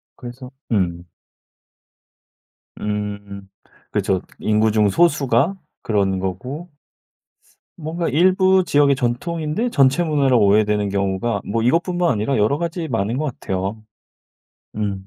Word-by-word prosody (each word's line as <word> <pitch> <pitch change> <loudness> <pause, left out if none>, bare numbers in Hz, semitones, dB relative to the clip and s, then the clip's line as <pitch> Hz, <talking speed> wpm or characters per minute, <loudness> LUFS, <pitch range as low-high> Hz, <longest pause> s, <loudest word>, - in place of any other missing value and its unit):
그래서 125 0 -9 0.2
음. 90 -5 0 1.7
음. 100 -1 -5 0.4
그렇죠. 95 -2 0 0.2
인구 110 +1 +2
중 105 -1 +3
소수가 145 - +2 0.3
그런 100 -3 0
거고. 125 - -5 1.1
뭔가 165 +1 -3
일부 185 +3 +4
지역의 145 -3 +3
전통인데 155 - -2
전체 135 - +3
문화로 140 -6 +2
오해되는 105 0 +3
경우가 100 +2 -1
뭐 115 +2 0
이것뿐만 175 +7 +1
아니라 110 +5 0
여러 110 +7 +2
가지 170 0 -3
많은 115 -2 -1
것 150 - -1
같아요. 95 +3 -3 0.9
음. 100 -2 -3
120 Hz, 240 characters per minute, -20 LUFS, 100-155 Hz, 1.7 s, 일부